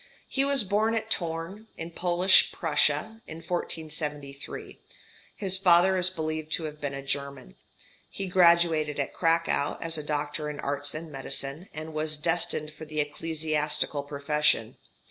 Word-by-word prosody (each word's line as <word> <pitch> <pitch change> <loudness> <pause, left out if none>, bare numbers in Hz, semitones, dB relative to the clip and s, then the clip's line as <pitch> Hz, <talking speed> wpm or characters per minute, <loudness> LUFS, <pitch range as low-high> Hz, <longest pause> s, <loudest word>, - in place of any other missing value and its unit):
He 270 - +1
was 275 -3 +3
born 215 +3 +1
at 220 0 +1
Thorn, 170 +5 -5
in 165 +1 -6
Polish 180 +2 +5
Prussia, 160 +6 0
in 160 - -8
1473. 150 -4 -4 0.6
His 190 -2 0
father 185 0 +5
is 185 0 +4
believed 155 -3 -4
to 165 - 0
have 150 -1 -7
been 140 -1 -3
a 140 - -6
German. 140 - -4 0.5
He 195 - -5
graduated 170 -5 +3
at 140 - -2
Cracow 165 -3 +1
as 165 -1 0
doctor 150 0 -2
in 150 - -7
arts 145 +1 -1
and 160 0 -7
medicine, 140 +4 -4
and 155 +1 -7
was 155 0 0
destined 155 -1 0
for 155 +1 -10
the 155 0 -5
ecclesiastical 150 -1 -1
profession. 145 +1 0
155 Hz, 145 wpm, -27 LUFS, 150-175 Hz, 0.6 s, Polish